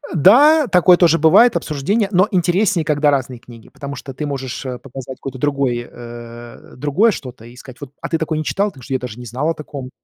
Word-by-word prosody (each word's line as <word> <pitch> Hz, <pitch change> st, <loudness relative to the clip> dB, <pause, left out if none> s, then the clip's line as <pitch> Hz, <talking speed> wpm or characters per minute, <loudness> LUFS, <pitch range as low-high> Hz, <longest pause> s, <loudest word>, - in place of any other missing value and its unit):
Да, 280 Hz, -, +6 dB
такое 180 Hz, -3 st, +5 dB
тоже 165 Hz, -2 st, +3 dB
бывает, 225 Hz, +10 st, +5 dB
обсуждение, 195 Hz, +9 st, -1 dB
но 185 Hz, +1 st, +3 dB
интереснее, 180 Hz, -1 st, +1 dB
когда 150 Hz, -1 st, +2 dB
разные 130 Hz, -3 st, -2 dB
книги, 115 Hz, -2 st, -15 dB
потому 140 Hz, 0 st, -8 dB
что 135 Hz, 0 st, -9 dB
ты 150 Hz, +4 st, -5 dB
можешь, 135 Hz, -3 st, -5 dB
э, 125 Hz, -1 st, -5 dB
показать 130 Hz, -1 st, -9 dB
какой-то 135 Hz, -1 st, -7 dB
другой, 135 Hz, -3 st, -1 dB
э, 120 Hz, 0 st, -11 dB
другое 150 Hz, -, +2 dB
что-то 125 Hz, -, -9 dB
и 120 Hz, +1 st, -14 dB
сказать: 130 Hz, +1 st, -13 dB
"Вот, 140 Hz, -2 st, -9 dB
а -, -, -4 dB
ты 165 Hz, -, 0 dB
такое 160 Hz, -1 st, -2 dB
не 155 Hz, -, -3 dB
читал? 200 Hz, +6 st, 0 dB
Потому 135 Hz, -9 st, -15 dB
что 135 Hz, -, -6 dB
я 130 Hz, -, 0 dB
даже 125 Hz, -2 st, -8 dB
не 125 Hz, -, -9 dB
знал 130 Hz, +7 st, -2 dB
о -, -, 0 dB
таком". 145 Hz, -4 st, -8 dB
140 Hz, 220 wpm, -18 LUFS, 125-170 Hz, -, Да